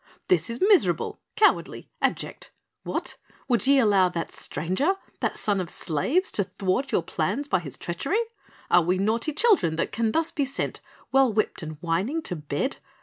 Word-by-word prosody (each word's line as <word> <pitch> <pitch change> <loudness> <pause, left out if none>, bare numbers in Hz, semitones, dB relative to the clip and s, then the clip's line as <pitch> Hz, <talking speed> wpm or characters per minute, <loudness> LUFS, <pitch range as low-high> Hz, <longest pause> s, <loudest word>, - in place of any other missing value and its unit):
"This 170 0 +3
is 235 +1 -3
miserable, 410 -4 +3
cowardly, 425 -1 +2
abject! - - -2 0.3
What? - - -3 0.3
Would 240 -3 +2
ye 280 0 +6
allow 200 -7 +4
that 170 -2 -4
stranger, 225 - 0 0.2
that - - -1
son 200 -2 +1
of 175 - -5
slaves, 255 - 0
to 200 - +1
thwart 190 +7 -1
your 170 - +2
plans 205 - -2
by 190 - +2
his 140 -6 -6
treachery? 230 - -2 0.5
Are 175 - +7
we 180 +3 +1
naughty 225 +9 0
children 320 - +3
that 165 - -1
can 225 -1 0
thus 325 +4 +1
be 290 - 0
sent, 275 +1 -3 0.3
well 270 -2 +4
whipped 215 -2 -1
and 155 -1 -7
whining 195 - -1
to 180 - -2
bed? 150 - -3
205 Hz, 170 wpm, -25 LUFS, 175-275 Hz, 0.5 s, Are